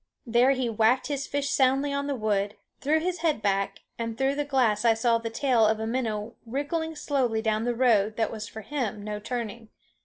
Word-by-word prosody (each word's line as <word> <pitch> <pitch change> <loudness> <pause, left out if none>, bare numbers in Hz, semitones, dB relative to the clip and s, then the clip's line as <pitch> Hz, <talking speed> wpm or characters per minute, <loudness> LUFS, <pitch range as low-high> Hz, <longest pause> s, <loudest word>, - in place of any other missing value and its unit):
There 240 +2 +4
he 255 -2 -1
whacked 230 +4 +2
his 280 -1 -2
fish 280 0 -1
soundly 270 +2 +2
on 280 0 -1
the 285 - -1
wood, 210 -3 0 0.2
threw 300 +3 +2
his 355 +1 -2
head 320 -6 +1
back, 200 -1 -1 0.2
and 230 -1 -3
through 270 +1 +2
the 290 +1 -1
glass 245 -7 +2
I 230 -1 +5
saw 230 0 +2
the 230 0 -4
tail 240 0 +2
of 220 0 +1
a 220 - -2
minnow 225 -2 -2
wriggling 290 +7 -3
slowly 250 -7 0
down 220 0 0
the 245 -1 0
road 220 -4 +3
that 225 -1 0
has 215 -1 -6
for 220 - -8
him 220 -4 -3
no 210 0 -4
turning. 230 0 -5
235 Hz, 210 wpm, -27 LUFS, 220-275 Hz, 0.2 s, I